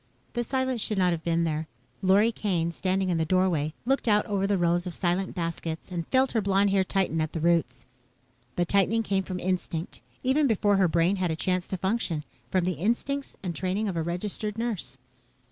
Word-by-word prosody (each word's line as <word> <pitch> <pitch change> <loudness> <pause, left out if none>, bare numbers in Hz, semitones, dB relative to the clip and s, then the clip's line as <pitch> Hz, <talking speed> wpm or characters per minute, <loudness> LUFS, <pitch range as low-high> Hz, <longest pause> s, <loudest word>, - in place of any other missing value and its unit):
The 240 - 0
silence 260 -1 -1
should 210 - 0
not 180 -1 +3
have 165 -1 -3
been 170 0 +1
there. 155 -1 -1 0.3
Lorry 200 +4 +4
Kane, 180 -6 -1
standing 190 +2 0
in 170 -2 +1
the - - +2
doorway, 165 -3 +1
looked 270 0 +1
out 210 -1 +4
over 195 -1 0
the 200 -1 +2
rows 175 +1 +1
of 175 - -5
silent 185 +2 -1
baskets 165 0 -4
and 170 -2 -3
felt 265 0 +3
her 225 - +1
blonde 200 0 +2
hair 195 -1 +3
tighten 185 -4 0
at 155 0 -2
the 165 - -2
roots. 170 -1 +1 0.7
The 175 - +1
tightening 200 +5 +2
came 195 -2 +1
from 185 -1 -5
instinct, 180 -2 -3 0.2
even 275 +3 +3
before 205 -3 +2
her 190 -2 +4
brain 170 +4 +2
had 185 -2 0
a 160 - 0
chance 180 +2 0
to 190 - -3
function, 190 -5 -1 0.3
from 185 -2 +1
the 185 - +1
instincts 265 +7 -1
and 180 -2 -2
training 190 +6 -1
of 190 - -2
a 165 - 0
registered 200 +5 -3
nurse. 195 - -3
185 Hz, 205 wpm, -27 LUFS, 170-205 Hz, 0.7 s, Lorry